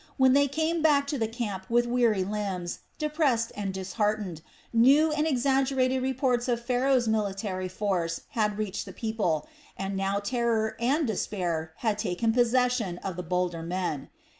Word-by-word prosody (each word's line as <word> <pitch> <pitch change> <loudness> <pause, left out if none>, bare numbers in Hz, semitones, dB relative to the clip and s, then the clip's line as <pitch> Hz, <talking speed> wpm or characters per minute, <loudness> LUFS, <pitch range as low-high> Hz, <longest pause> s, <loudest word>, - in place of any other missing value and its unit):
When 260 -1 +5
they 285 +1 +5
came 315 +4 0
back 290 -3 +4
to 285 -3 -2
the 225 - +1
camp 215 -5 -5
with 240 +1 +3
weary 235 -5 +2
limbs, 190 -3 -3 0.2
depressed 295 -7 +1
and 205 -2 -3
disheartened, 190 -2 -2 0.3
new 275 +7 +5
and 300 +1 +1
exaggerated 265 -1 +2
reports 260 -1 0
of 235 -1 -1
Pharaoh's 250 0 +2
military 195 -3 -1
force 180 -3 -1
had 210 -2 0
reached 210 -2 -3
the - - -8
people, 205 -9 -1 0.3
and 195 0 -3
now 195 +1 0
terror 220 0 0
and 280 +7 +2
despair 175 -7 -2
had 215 -2 +1
taken 225 +6 0
possession 245 -5 +2
of 190 -3 -3
the 180 - -4
bolder 180 -1 -1
men. 170 -4 -3
220 Hz, 155 wpm, -28 LUFS, 190-255 Hz, 0.3 s, When